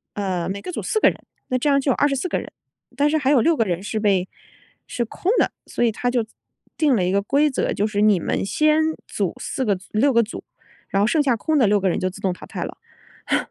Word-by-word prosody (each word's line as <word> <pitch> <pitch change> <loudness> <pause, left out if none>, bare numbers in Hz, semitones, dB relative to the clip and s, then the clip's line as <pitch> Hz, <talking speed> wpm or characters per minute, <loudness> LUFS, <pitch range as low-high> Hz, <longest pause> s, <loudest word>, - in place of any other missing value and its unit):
呃， 185 -4 -2
每 200 +1 -3
个 360 - -6
组 - - -4
4 435 - 0
个 - - +6
人， - - -11 0.3
那 255 - +1
这 295 - +1
样 280 -1 +4
就 270 0 +1
有 - - +1
24 280 +3 +1
个 - - -1
人。 - - -9 0.5
但 285 +1 +3
是 315 - +2
还 270 -2 0
有 275 -3 +5
6 325 +7 +3
个 225 - +1
人 180 0 -2
是 215 +1 -3
被 195 -3 +2 0.6
是 240 - -2
空 365 - -2
的， - - +2 0.2
所 - - -2
以 230 - +2
他 245 +3 -2
就 245 -2 0 0.5
定 295 -5 +3
了 185 -4 +1
一 180 - 0
个 200 +1 +2
规 285 +8 +2
则， 265 - -1
就 205 - 0
是 210 -1 -1
你 210 -3 +4
们 - - -1
先 305 +9 +2 0.3
组 - - -2
4 265 - -3
个 210 -5 +2
组 185 - -13
6 270 +6 +3
个 235 -1 +4
组， 215 - -8 0.5
然 195 - +1
后 205 - +4
剩 300 +6 +2
下 265 -4 +2
空 315 +7 -1
的 245 -7 +4
6 205 0 +3
个 195 - 0
人 - - -1
就 185 - 0
自 190 - -11
动 190 -2 0
淘 - - -12
汰 - - -5
了。 - - -7 0.5
哼。 - - +4
230 Hz, 260 characters per minute, -22 LUFS, 200-285 Hz, 0.6 s, 个